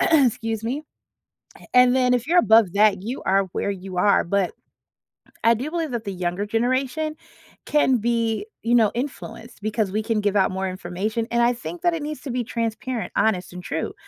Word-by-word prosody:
Excuse 230 -7 +2
me, 270 +6 -2 0.9
and 250 0 +6
then 250 -1 +3
if 245 +1 0
you're 350 +3 +3
above 220 - +5
that, 200 -2 +4
you 235 +6 -5
are 195 +1 +3
where 200 - -1
you 185 -1 -7
are, 200 +3 +4
but 195 0 0 0.9
I 230 - +6
do 260 +7 -4
believe 330 -2 -2
that 230 -2 -3
the 200 - -4
younger 180 +2 -2
generation 255 +7 -1 0.5
can 265 -4 +3
be, 230 - 0 0.2
you 235 +1 +1
know, 225 -4 +5
influenced 235 -3 -6
because 215 -1 -1
we 215 - 0
can 220 0 0
give 205 -1 0
out 190 -2 +3
more 190 0 -2
information, 190 +5 -3
and 235 0 +2
I 240 - +4
think 335 +8 -7
that 345 -1 +2
it 320 - -4
needs 305 0 -5
to 275 - -6
be 245 0 -1
transparent, 230 +1 -3
honest, 190 -5 +1
and 180 - -7
true. 160 -2 -3
225 Hz, 190 wpm, -23 LUFS, 200-250 Hz, 0.9 s, and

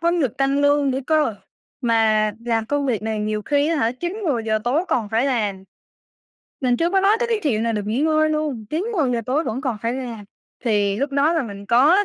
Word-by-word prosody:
hông 340 +1 +1
được 260 -7 -1
tăng 275 +1 +1
lương 285 -1 +3
nữa 260 - -1
cơ, 305 -8 +2 0.5
mà 220 -3 +2
làm 225 -2 0
công 290 +1 -1
việc 225 -4 -1
này 220 -1 -2
nhiều 210 0 -2
khi 285 +5 +1
á 330 - +1
hả, 230 -3 +1
9:00-10:00 265 - -1
tối 290 +9 +1
còn 225 -4 0
phải 230 +5 +1
làm. 205 -7 -1 1.0
Mình 250 -2 +2
chưa 340 +4 +1
có 390 - +3
nói 405 +3 +4
tới 475 - 0
cái 445 -2 0
chuyện 225 -7 +1
là 230 - 0
được 210 -2 -3
nghỉ 225 +5 -1
ngơi 310 0 +2
luôn, 295 -8 -2
9:00-10:00 310 - 0
tối 295 +6 0
vẫn 240 +4 -3
còn 255 -6 -2
phải 230 +1 0
làm. 240 -5 -6 0.4
Thì 205 -3 +1
lúc 280 +4 -1
đó 285 +4 +2
là 325 - +1
mình 200 -3 -8
có 305 - +5
260 Hz, 220 wpm, -21 LUFS, 220-310 Hz, 1.0 s, có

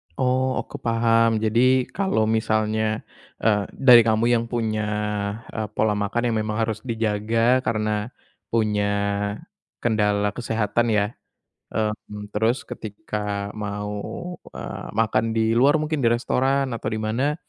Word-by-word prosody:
Oh, 130 0 +1
oke 145 - -9
paham. 115 -1 +3
Jadi, 125 +4 +4
kalau 190 - +1
misalnya, 110 0 0 0.4
eee, 105 -2 +3
dari 125 -3 +8
kamu 110 +1 +2
yang 115 -1 +3
punya, 110 -3 -1 0.7
eee, 110 -1 -3
pola 110 -1 +2
makan 120 +4 0
yang - - 0
memang 110 +1 -1
harus 110 -1 -2
dijaga 115 +2 +1
karena 110 -3 -1 0.4
punya 105 -3 +1 1.0
kendala 105 -3 +2
kesehatan 115 0 0
ya, 100 0 +3 0.7
mmm, 105 -1 -3
terus 110 +4 +1
ketika 105 -3 -4
mau, 105 - -5 0.2
eee, - - -7
makan 115 0 +2
di 110 0 +1
luar 145 +5 +4
mungkin 155 -4 -1
di - - +6
restoran 135 +3 +1
atau 110 - -4
di 110 - -2
mana, 125 +7 0
110 Hz, 125 wpm, -23 LUFS, 105-120 Hz, 1.0 s, dari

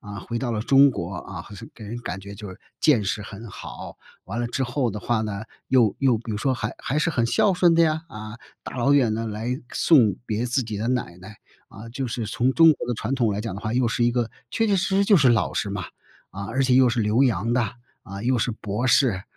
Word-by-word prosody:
啊， 100 -2 -8
回 115 +3 -4
到 120 -2 -2
了 105 - -1
中 135 +4 +5
国， 90 -5 -5
啊， - - -7
好 - - -14
像 115 +2 -10
给 110 - -11
人 115 +3 -6
感 95 - -5
觉 100 +1 -9
就 105 0 -9
是 95 - -10 0.2
见 130 -9 +4
识 100 +2 -2
很 105 +2 -9
好， - - -9 0.3
完 110 +5 -4
了 120 - -1
之 125 +3 -2
后 125 -1 -1
的 105 0 -6
话 120 -1 0
呢 105 -1 -4 0.3
又 120 -6 +3
又 130 -4 +3
比 115 +1 -8
如 105 - -2
说 130 +2 +1
还 105 -3 -3
还 140 - -3
是 170 +2 +1
很 120 -6 +1
孝 205 - +3
顺 175 -2 +4
的 170 - +5
呀， 160 0 +1
啊， 110 -1 -9 0.2
大 - - -8
老 130 +3 +2
远 130 -6 +3
呢， 115 +1 -3
来 115 +4 -3
送 120 - +4
别 110 +3 -1
自 125 +2 0
己 110 -3 -5
的 105 +3 -3
奶 120 -9 -2
奶。 100 +3 -12 0.3
啊， 110 +3 -10
就 130 +3 -4
是 115 -1 -3
从 125 +4 0
中 165 +1 +7
国 130 - -6
的 120 - 0
传 115 +4 -2
统 120 -5 +1
来 100 0 -2
讲 110 -3 -4
的 100 - -7
话， 110 - -3
又 125 0 +2
是 115 +1 -1
一 120 - +3
个 120 -2 -1 0.2
确 225 - +1
确 205 - +2
实 190 +1 0
实 200 - +4
就 200 -1 +5
是 135 -5 +5
老 115 -3 +2
师 100 - -1
嘛， 95 -3 -4 0.5
啊， 100 +1 -6
而 130 +5 0
且 130 -1 +3
又 130 -1 +6
是 115 - -1
留 110 +4 +2
洋 115 -3 +1
的， 125 - +2 0.4
啊， 100 -2 -8
又 125 +1 +2
是 120 - 0
博 110 +2 -3
士， 115 -8 +3
115 Hz, 280 characters per minute, -24 LUFS, 105-130 Hz, 0.5 s, 中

